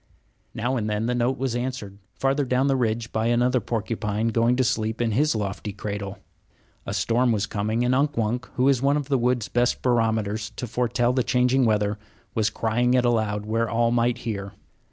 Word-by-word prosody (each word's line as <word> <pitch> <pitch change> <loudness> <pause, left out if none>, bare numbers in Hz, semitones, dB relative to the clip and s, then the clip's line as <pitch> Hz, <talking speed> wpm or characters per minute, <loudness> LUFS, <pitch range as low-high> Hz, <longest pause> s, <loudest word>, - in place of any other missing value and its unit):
Now 120 +4 -1
and 110 -2 -2
then 105 +1 -1
the 125 - 0
note 120 +2 0
was 130 -3 -2
answered, 120 -6 -4 0.2
farther 135 +2 +1
down 130 0 +1
the 135 -1 +2
ridge, 115 -2 -1
by 110 +1 0
another 125 +2 +2
porcupine 110 -1 -2
going 115 +2 +2
to 130 - +2
sleep 110 -1 -1
in 120 -1 +1
his 145 +5 +2
lofty 105 0 -3
cradle. 100 -1 -5 0.7
A - - -3
storm 120 +1 +2
was 105 -2 +1
coming; 110 +3 -1
and 125 - +2
Unk 145 +1 +1
Wunk, 115 +2 -1
who 130 +1 +2
is 135 -3 +3
one 140 +2 +3
of 145 -1 -4
the 135 -2 +2
wood's 120 -2 +1
best 120 0 0
barometers 110 -3 0
to - - -4
foretell 120 +1 0
the 130 - +2
changing 125 +1 +2
weather, 105 -1 +1 0.3
was 110 -1 +1
crying 120 +3 +1
it 125 -1 +3
aloud 110 -3 0
where 115 +1 0
all 115 0 +2
might 120 0 +2
hear. 100 -5 -5
115 Hz, 195 wpm, -24 LUFS, 110-125 Hz, 0.7 s, is